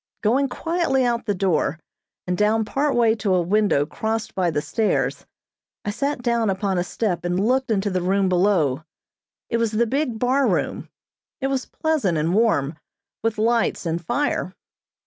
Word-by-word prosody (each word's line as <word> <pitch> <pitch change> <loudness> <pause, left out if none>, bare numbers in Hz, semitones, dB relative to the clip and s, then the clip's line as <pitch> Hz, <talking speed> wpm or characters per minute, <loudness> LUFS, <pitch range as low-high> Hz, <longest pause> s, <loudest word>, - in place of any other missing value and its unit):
Going 260 +6 +2
quietly 325 -4 0
out 235 -1 -1
the 205 - +1
door, 170 -5 0 0.5
and 180 - -1
down 215 +3 +2
part 275 +6 0
way 230 -2 +4
to 200 -3 +1
a 180 - +3
window 200 -6 +2
crossed 220 +6 -3
by 180 -2 +1
the 150 - 0
stairs, 145 - -1 0.6
I 205 - -1
sat 275 +3 -2
down 235 -3 +1
upon 190 -1 0
a - - +1
step 180 -2 -2
and 175 +1 0
looked 260 +5 +1
into 205 -2 0
the 185 -1 0
room 190 +2 +1
below. 175 -7 +2 0.6
It 235 - 0
was 230 -1 0
the 230 +2 +2
big 260 -1 -1
bar 260 +4 +2
room. - - -1 0.5
It 270 - -1
was 265 -1 -2
pleasant 290 - 0
and 160 +3 0
warm, 170 -9 +1 0.4
with 225 -1 -1
lights 230 -2 +1
and 170 +1 -2
fire. 200 - -1
215 Hz, 170 wpm, -23 LUFS, 180-240 Hz, 0.6 s, way